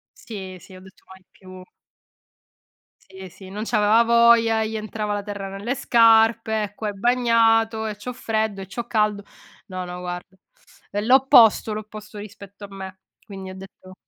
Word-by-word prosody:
Sì, 190 Hz, -5 st, -9 dB
sì, 190 Hz, -, -15 dB
ho 185 Hz, -, -12 dB
detto: 190 Hz, 0 st, -18 dB
"Mai 190 Hz, 0 st, -16 dB
più". 185 Hz, -1 st, -14 dB, 1.4 s
Sì, 190 Hz, 0 st, -12 dB
sì, 185 Hz, +2 st, -14 dB
non 205 Hz, +3 st, -6 dB
c'aveva 220 Hz, 0 st, +3 dB
voglia, 235 Hz, -1 st, +4 dB
e 220 Hz, -, -1 dB
gli 225 Hz, -, -5 dB
entrava 215 Hz, -1 st, -4 dB
la 205 Hz, -, -3 dB
terra 200 Hz, -1 st, -6 dB
nelle 200 Hz, +7 st, -4 dB
scarpe, 225 Hz, -3 st, +3 dB
"E 205 Hz, 0 st, -8 dB
qua 215 Hz, -, -5 dB
è 205 Hz, -, -3 dB
bagnato, 225 Hz, 0 st, +2 dB
e 215 Hz, -, -4 dB
c'ho 230 Hz, +5 st, -7 dB
freddo, 220 Hz, -4 st, -2 dB
e 190 Hz, -, -7 dB
c'ho 235 Hz, +5 st, -6 dB
caldo". 210 Hz, -3 st, 0 dB, 0.4 s
No, 185 Hz, -1 st, -6 dB
no, 180 Hz, 0 st, -8 dB
guarda, 180 Hz, +1 st, -7 dB, 0.5 s
è 205 Hz, -, -2 dB
l'opposto 235 Hz, -2 st, +5 dB
l'opposto 215 Hz, 0 st, -9 dB
rispetto 205 Hz, -1 st, -11 dB
a 200 Hz, -, -9 dB
me, 190 Hz, -1 st, -9 dB, 0.3 s
quindi 195 Hz, -3 st, -9 dB
ho 185 Hz, -, -9 dB
detto 190 Hz, -1 st, -13 dB
210 Hz, 170 wpm, -22 LUFS, 195-225 Hz, 1.4 s, l'opposto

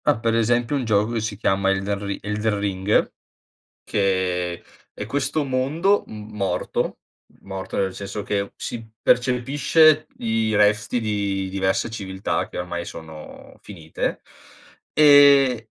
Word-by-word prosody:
Ah, 145 Hz, -6 st, +2 dB
per 115 Hz, 0 st, 0 dB
esempio 120 Hz, +3 st, +1 dB
un 135 Hz, -, -1 dB
gioco 110 Hz, 0 st, +1 dB
che 115 Hz, -, -1 dB
si 105 Hz, -2 st, -4 dB
chiama 95 Hz, -2 st, +1 dB
Elden 100 Hz, +1 st, -1 dB
Ri 100 Hz, 0 st, -3 dB
Elden 105 Hz, +1 st, -1 dB
Ring, 100 Hz, 0 st, 0 dB, 0.7 s
che 90 Hz, -3 st, -1 dB, 0.3 s
è 105 Hz, -, -7 dB
questo 145 Hz, +5 st, -1 dB
mondo 145 Hz, +10 st, +1 dB
m 105 Hz, 0 st, -10 dB
morto, 100 Hz, -2 st, -2 dB, 0.5 s
morto 95 Hz, -1 st, -6 dB
nel 95 Hz, -1 st, -1 dB
senso 100 Hz, +1 st, -6 dB
che 100 Hz, -1 st, -2 dB
si 115 Hz, -1 st, -6 dB, 0.2 s
percepisce 145 Hz, +5 st, +3 dB
i 110 Hz, -1 st, 0 dB
resti 105 Hz, +3 st, +2 dB
di 100 Hz, -3 st, -2 dB
diverse 95 Hz, +2 st, 0 dB
civiltà, 95 Hz, -3 st, -3 dB
che -, -, -8 dB
ormai 85 Hz, -1 st, -4 dB
sono 80 Hz, -2 st, -11 dB
finite 80 Hz, -6 st, -5 dB, 0.7 s
ehm, 140 Hz, -3 st, +7 dB
105 Hz, 130 wpm, -22 LUFS, 95-125 Hz, 0.7 s, ehm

